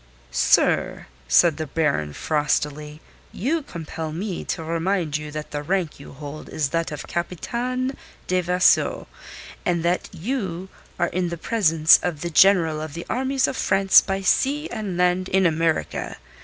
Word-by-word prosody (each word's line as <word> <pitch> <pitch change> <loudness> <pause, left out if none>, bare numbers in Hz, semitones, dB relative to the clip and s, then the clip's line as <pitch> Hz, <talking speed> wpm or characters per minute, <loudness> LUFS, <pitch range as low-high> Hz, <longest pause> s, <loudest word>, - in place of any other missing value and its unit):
"Sir," 60 - +2 0.2
said 165 - +4
the 155 -1 -4
Baron 140 - -1
frostily, 150 - -2 0.3
"you 310 - -1
compel 165 - -6
me 180 +3 -4
to 170 -2 -3
remind 165 -1 -1
you 150 0 -3
that 150 0 -7
the 145 - -3
rank 175 0 -2
you 140 - -11
hold 145 +2 -9
is 150 -3 -1
that 165 +1 -1
of 150 - -6
Capitaine 250 - -3 0.3
de 185 0 +1
Vaisseau, 180 +1 +2 0.6
and 170 -3 0
that 175 +1 0
you 190 -2 -4 0.3
are 175 -1 +1
in 180 0 -1
the 170 - -5
presence 165 -5 +4
of 165 -5 -3
the 170 - -3
General 165 -4 +4
of 155 -1 -7
the 170 - -6
Armies 265 +1 +1
of - - -3
France 195 -6 +5
by 195 0 -3
Sea 285 - +1
and 210 -6 -4
Land 180 +1 +1
in 190 0 +2
America. 165 -1 -1
170 Hz, 155 wpm, -23 LUFS, 155-195 Hz, 0.6 s, France